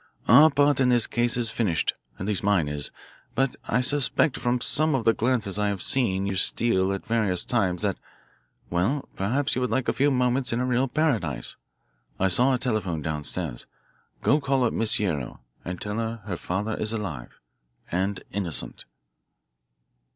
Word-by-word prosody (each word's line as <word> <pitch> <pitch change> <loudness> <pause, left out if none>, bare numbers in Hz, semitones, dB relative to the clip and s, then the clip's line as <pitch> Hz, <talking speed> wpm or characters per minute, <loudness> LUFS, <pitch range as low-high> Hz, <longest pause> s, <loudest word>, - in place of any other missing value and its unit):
Our 145 +7 +8
part 145 -1 +2
in 130 -2 +3
this 120 -3 +4
case 120 0 +1
is 115 -2 0
finished 95 -9 0 0.2
at 95 - -5
least 105 -2 -1
mine 100 -6 +2
is. 75 0 -1 0.5
But 135 -1 0
I 125 - +1
suspect 140 +1 +2
from 125 0 0
some 155 +4 +3
of 125 - -1
the 115 - +4
glances 110 -5 -1
I 105 - +1
have 100 -2 -2
seen 100 -7 +2
you 100 -1 -2
steal 95 -2 +2
at 95 - -4
various 105 -6 0
times 95 -8 0
that - - -1 0.7
well, 100 +12 0
perhaps 130 +9 -1
you 125 - -1
would 125 - 0
like 130 -1 -1
a - - +1
few 140 +2 +2
moments 125 -1 +1
in 115 - -1
a 125 - 0
real 125 +1 +1
paradise. 115 - -1 0.6
I 95 - +2
saw 125 +8 +5
a - - 0
telephone 105 - -2
down 75 -1 -3
stairs. 75 -4 -5 0.6
Go 145 - +3
call 135 -2 +1
up 115 - +1
Miss 115 -1 +2
Guerrero 80 - -3 0.2
and 90 0 -6
tell 105 +2 -4
her 115 -1 -4
her 100 -4 -3
father 100 +6 -3
is 110 +1 -2
alive 85 - -6 0.5
and 95 +2 -2
innocent." 90 -6 -3
110 Hz, 180 wpm, -25 LUFS, 95-125 Hz, 0.7 s, Our